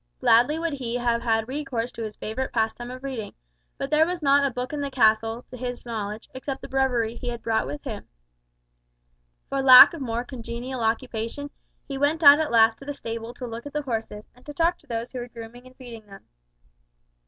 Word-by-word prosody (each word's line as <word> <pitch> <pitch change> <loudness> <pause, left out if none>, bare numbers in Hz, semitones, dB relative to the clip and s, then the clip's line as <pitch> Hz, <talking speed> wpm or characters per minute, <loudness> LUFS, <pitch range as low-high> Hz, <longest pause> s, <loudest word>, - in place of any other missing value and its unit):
Gladly 245 +7 +4
would 330 -1 -2
he 245 -4 -4
have 240 -1 0
had 225 -2 0
recourse 255 -4 -3
to - - -9
his 215 -1 -5
favourite 260 +5 -4
pastime 225 +1 -2
of 255 +1 -9
reading, 255 -6 -5 0.4
but 275 - -4
there 305 +1 +5
was 355 -2 -4
not 280 0 +4
a 280 - +2
book 250 +2 -5
in 295 - -3
the 280 - -2
castle, 225 -1 +2
to 250 - -8
his 245 0 -6
knowledge, 215 -2 -5
except 265 +1 -6
the - - -6
breviary 250 -4 0
he 245 - -7
had 235 -1 -6
brought 220 - 0
with 145 +1 -6
him. - - -7 1.4
For 275 0 -1
lack 255 +2 +10
of 330 - -7
more 235 -2 -2
congenial 245 0 -6
occupation, 230 +4 -2 0.4
he 275 -1 -5
went 305 +3 +1
out 285 +1 +9
at 315 - 0
last 225 -1 +4
to 275 - -12
the 290 - -4
stable 230 -2 -6
to 255 - -7
look 235 +3 -7
at 285 - -10
the 300 0 -2
horses, 225 -4 -4
and 250 - -22
to 295 - -8
talk 340 +2 +1
to 295 - -25
those 230 -1 -4
who 255 - -5
were 240 - -6
grooming 235 +1 -11
and 255 - -18
feeding 235 -5 -11
them. 195 -1 -14
245 Hz, 215 wpm, -25 LUFS, 225-275 Hz, 1.4 s, lack